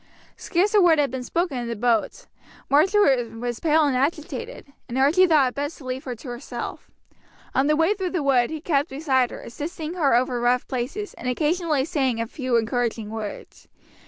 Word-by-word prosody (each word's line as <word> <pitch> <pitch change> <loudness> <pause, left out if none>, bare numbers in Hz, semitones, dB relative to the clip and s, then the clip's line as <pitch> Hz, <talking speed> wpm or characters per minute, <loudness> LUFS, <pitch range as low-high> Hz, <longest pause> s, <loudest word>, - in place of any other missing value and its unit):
Scarce 385 +4 0
a 415 - +6
word 340 -3 +5
had 285 -4 +1
been 260 -1 -4
spoken 335 -1 -1
in 240 - -4
the 235 - -3
boat. 230 0 0 0.5
Marjory 295 - +4
was 240 0 -4
pale 315 -1 +3
and 280 -3 +1
agitated, 305 - -3 0.2
and 240 - -3
Archie 310 +8 +5
thought 295 -6 +4
it - - -13
best 290 +3 -4
to 275 - -13
leave 255 +1 -4
her 250 -2 -4
to 235 - -12
herself. 245 +2 -7 0.6
On 270 +2 +2
the 305 - +3
way 325 +6 +3
through 380 -3 -3
the 350 -4 -2
wood 255 -4 +3
he 315 -1 -5
kept 290 -2 0
beside 265 -3 +1
her, - - -9
assisting 310 +5 -6
her 300 -9 +2
over 245 0 +1
rough 245 +1 +1
places, 270 - -4
and 250 - -5
occasionally 305 +1 0
saying 265 -7 0
a 230 - 0
few 255 0 -2
encouraging 230 -2 -1
words. 220 -2 -7
275 Hz, 195 wpm, -24 LUFS, 245-325 Hz, 0.6 s, a